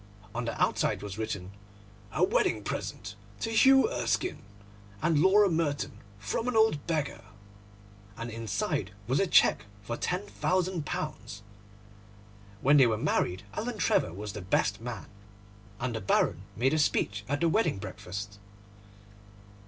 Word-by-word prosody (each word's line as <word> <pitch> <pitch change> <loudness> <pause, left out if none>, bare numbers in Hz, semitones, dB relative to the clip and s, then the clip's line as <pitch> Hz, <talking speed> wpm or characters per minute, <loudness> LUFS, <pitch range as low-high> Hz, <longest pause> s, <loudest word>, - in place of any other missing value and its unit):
On 120 0 -3
the 115 - -4
outside - - +1
was 105 0 -6
written, 100 -4 -4 0.6
'A - - +1
wedding - - +2
present 105 +1 -4 0.3
to 225 - -2
Hugh 265 - +6
Erskine 370 -5 -1 0.6
and 155 +4 +2
Laura 200 +3 +6
Merton, 160 -5 -1 0.2
from 105 - -3
an 250 - -1
old 220 -10 +3
beggar,' 150 -8 -2 0.9
and 115 +1 -5
inside 115 -3 -2
was - - +1
a - - +2
cheque - - +4 0.2
for 120 +3 -3
£10,000. 180 - -2 1.2
When 145 +3 +5
they 130 -3 +7
were 110 -2 +1
married 95 -4 0
Alan 230 +1 -3
Trevor 165 - +2
was 100 +3 -6
the 105 - -6
best 100 +3 0
man, 115 -4 -6 0.7
and 120 -1 -2
the 110 - -3
Baron 95 - +2
made 130 +6 +2
a 155 - +2
speech 100 -8 +1
at 145 +1 0
the 170 - +4
wedding 210 - +2
breakfast. 100 +1 -7
120 Hz, 135 wpm, -29 LUFS, -, 1.2 s, they